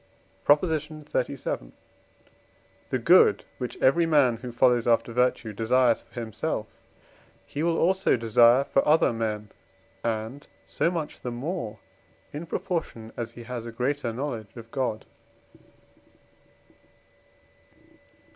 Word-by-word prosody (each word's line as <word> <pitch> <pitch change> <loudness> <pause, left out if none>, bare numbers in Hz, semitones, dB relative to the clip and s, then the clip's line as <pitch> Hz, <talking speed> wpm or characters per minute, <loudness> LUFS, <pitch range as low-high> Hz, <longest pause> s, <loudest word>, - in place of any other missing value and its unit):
PROP. 145 +3 +5
XXXVII. 150 - -3 1.2
The 130 - +1
good 125 - +5
which 125 -2 -5
every 165 +6 +4
man, 140 -7 +4
who 125 +2 -7
follows 120 -1 +3
after 115 0 +2
virtue, 125 -2 +1
desires 120 +2 +2
for - - -10
himself 110 -3 -3 0.8
he 145 - -5
will 165 0 +1
also 190 -4 +2
desire 115 +3 +5
for 135 - +1
other 150 -5 +4
men, 105 -2 -3 0.5
and 115 +5 -3 0.2
so - - 0
much 165 -4 -4
the 125 - -4
more, 120 - -4 0.6
in 155 +4 -6
proportion 155 - -4
as 115 -2 -5
he 120 - -10
has 120 -1 -6
a - - -6
greater 125 +1 -1
knowledge 115 -4 -5
of 115 0 -11
God. 130 -5 -2
125 Hz, 120 wpm, -26 LUFS, 115-150 Hz, 1.2 s, PROP